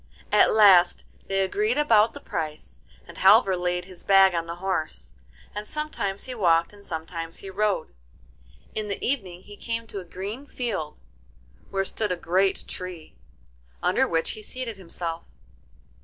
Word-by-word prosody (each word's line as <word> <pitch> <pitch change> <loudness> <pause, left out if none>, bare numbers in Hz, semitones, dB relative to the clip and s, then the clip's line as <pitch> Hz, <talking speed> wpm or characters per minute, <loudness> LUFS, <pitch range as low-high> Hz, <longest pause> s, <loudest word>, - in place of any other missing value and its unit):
At - - +6
last 195 -5 +6 0.2
they 195 0 +1
agreed 210 +6 0
about 225 -7 +4
the - - -7
price, 155 -2 -5 0.3
and - - -10
Halvor 195 0 +6
laid 180 0 -1
his 185 -1 -12
bag 195 -1 +6
on 165 -1 -2
the 170 - -5
horse, 175 - -3 0.4
and 210 0 -5
sometimes 300 -11 -2
he 255 - -6
walked 170 -5 +2
and 205 -1 -16
sometimes 165 -1 -5
he 195 - -8
rode. 205 - 0 0.8
In 215 -1 -3
the 200 - -2
evening 190 -9 -2
he 205 - -12
came 230 +1 -4
to 205 -3 -6
a - - -7
green 200 +10 -7
field, 200 - -4 0.7
where 195 0 -1
stood 210 +1 0
a - - +1
great 185 +3 0
tree, 180 -4 -7 0.7
under - - +3
which 165 -1 0
he 215 - -8
seated 230 -1 -6
himself. 170 -2 -6
195 Hz, 155 wpm, -25 LUFS, 175-215 Hz, 0.8 s, At